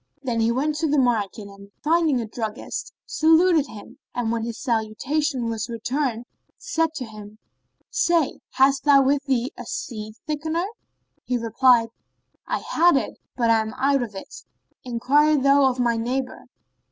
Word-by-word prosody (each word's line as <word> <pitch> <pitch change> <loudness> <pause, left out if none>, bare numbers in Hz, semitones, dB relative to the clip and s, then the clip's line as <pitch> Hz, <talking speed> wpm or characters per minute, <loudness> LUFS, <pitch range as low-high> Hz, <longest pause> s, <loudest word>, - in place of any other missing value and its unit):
Then 240 -3 -1
he 225 +1 +2
went 280 +5 0
to 320 +1 0
the 295 0 +1
market 220 -5 0
and, 200 0 -14
finding 315 -4 +2
a 230 - -3
druggist, 220 0 -5
saluted 325 -1 +4
him; 210 -5 -12 0.2
and 235 -2 -1
when 230 -1 -1
his 230 0 -5
salutation 245 +4 -1
was 225 +1 -3
returned 240 +1 -2 0.3
said 325 0 -1
to 265 -5 -4
him, 215 -1 -11 0.5
"Say, 345 - +1
hast 270 +1 +3
thou 280 -2 +6
with 275 +1 +1
thee 260 -1 0
a - - -7
seed 215 -2 -6
thickener?" 315 +3 -1 0.6
He 250 - -1
replied, 230 0 +3 0.6
"I - - -1
had 340 -3 +4
it, - - -3 0.2
but 235 -2 +3
am 220 +1 +1
out 275 +1 +2
of 220 -4 -5
it: 195 - -9 0.4
enquire 275 +5 +3
thou 275 0 +4
of 255 0 -4
my 235 -2 +2
neighbour." 255 +3 -3
255 Hz, 155 wpm, -23 LUFS, 230-290 Hz, 0.6 s, thou